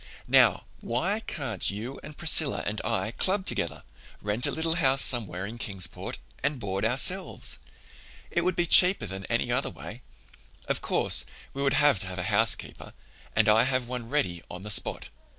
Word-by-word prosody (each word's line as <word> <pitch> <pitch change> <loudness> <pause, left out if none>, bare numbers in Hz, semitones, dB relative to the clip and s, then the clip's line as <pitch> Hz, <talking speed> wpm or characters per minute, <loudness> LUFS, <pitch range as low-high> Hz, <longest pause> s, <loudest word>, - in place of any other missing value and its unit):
"Now, - - +4 0.2
why 180 - -1
can't 135 - -2
you 110 +7 -5
and 150 - -11
Priscilla 160 -3 +4
and 105 +1 -3
I 110 0 -1
club 190 - -1
together, - - -2 0.4
rent 105 +4 0
a - - 0
little 160 +1 0
house 135 -4 +3
somewhere 100 -7 +1
in 115 +3 -8
Kingsport, 95 -5 -4 0.2
and 145 - -1
board 95 -2 -3
ourselves? 135 - +1 0.7
It 170 - +1
would 185 +1 +1
be 175 - +1
cheaper 180 +3 +5
than 95 +1 -5
any - - -1
other - - 0
way. - - -10 0.7
Of - - -1
course, - - +3 0.3
we 140 - -5
would 135 -2 +1
have 145 -8 +4
to 95 - -3
have 95 0 -6
a 90 - -2
housekeeper 110 +2 0 0.4
and 110 -1 +3
I 105 +1 +5
have 130 -2 -1
one 125 -2 -6
ready 105 - -1
on 90 +1 -8
the 105 - -5
spot. - - 0
120 Hz, 175 wpm, -27 LUFS, 105-150 Hz, 0.7 s, cheaper